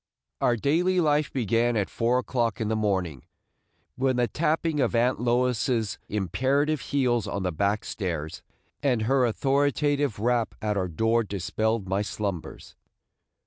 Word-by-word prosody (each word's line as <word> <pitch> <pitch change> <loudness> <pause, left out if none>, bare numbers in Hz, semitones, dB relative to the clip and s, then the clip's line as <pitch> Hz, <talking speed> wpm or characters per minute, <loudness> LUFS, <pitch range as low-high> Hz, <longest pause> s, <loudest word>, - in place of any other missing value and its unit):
Our 120 - +3
daily 170 - +1
life 150 -2 +2
began 120 -1 +1
at 100 - 0
four 120 +2 +1
o'clock 120 -4 -1
in 110 -2 -1
the 110 - +1
morning, 95 - -1 0.7
when 130 0 +1
the 120 -1 +2
tapping 160 +1 0
of 125 -3 +1
Aunt 120 +2 +2
Lois's 120 -2 0
imperative 135 - 0
heels 125 -5 0
on 100 - -3
the 90 - 0
back 100 +6 0
stairs, 85 -6 -4 0.4
and 125 -6 +1
her 130 +2 +3
authoritative 145 +1 +1
rap 115 +1 0
at 105 -1 -1
our 95 -2 0
door 115 +7 +1
dispelled 105 +1 -2
my 95 +1 0
slumbers. 100 -4 -5
115 Hz, 145 wpm, -26 LUFS, 105-135 Hz, 0.7 s, Our